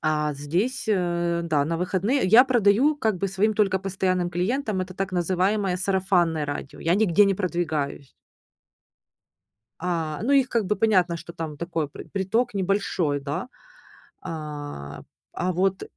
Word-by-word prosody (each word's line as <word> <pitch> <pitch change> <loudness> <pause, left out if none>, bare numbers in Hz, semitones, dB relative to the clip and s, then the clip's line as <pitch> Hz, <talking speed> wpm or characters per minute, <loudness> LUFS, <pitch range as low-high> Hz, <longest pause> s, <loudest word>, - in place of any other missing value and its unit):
А 150 -1 0
здесь, 170 - -1
э, 175 -3 0
да, 155 -4 +1
на 165 +2 -1
выходные 190 +9 0
я 225 +7 +7
продаю 245 +4 +3
как 220 -8 0
бы 195 - 0
своим 200 +3 +1
только 195 -3 +2
постоянным 185 -2 -1
клиентам- 205 +3 -1
это 185 0 -5
так 195 0 -3
называемое 185 +2 0
"сарафанное 180 -5 +1
радио". 145 -1 -6
Я 170 +2 +1
нигде 205 -1 +4
не 195 - +2
продвигаюсь. 160 -7 -2 1.7
А, 165 -3 -2
ну 275 - +2
их 270 -2 +4
как 230 -6 0
бы 210 +1 0
понятно, 185 -5 +2
что 170 0 -10
там 160 -3 -6
такой 165 -2 -3
пр - - -10
приток 200 +5 0
небольшой, 185 -6 0
да, 140 - -4 0.7
а 145 - -7 0.3
а 185 +1 -1
вот 190 +2 0
180 Hz, 145 wpm, -25 LUFS, 165-200 Hz, 1.7 s, я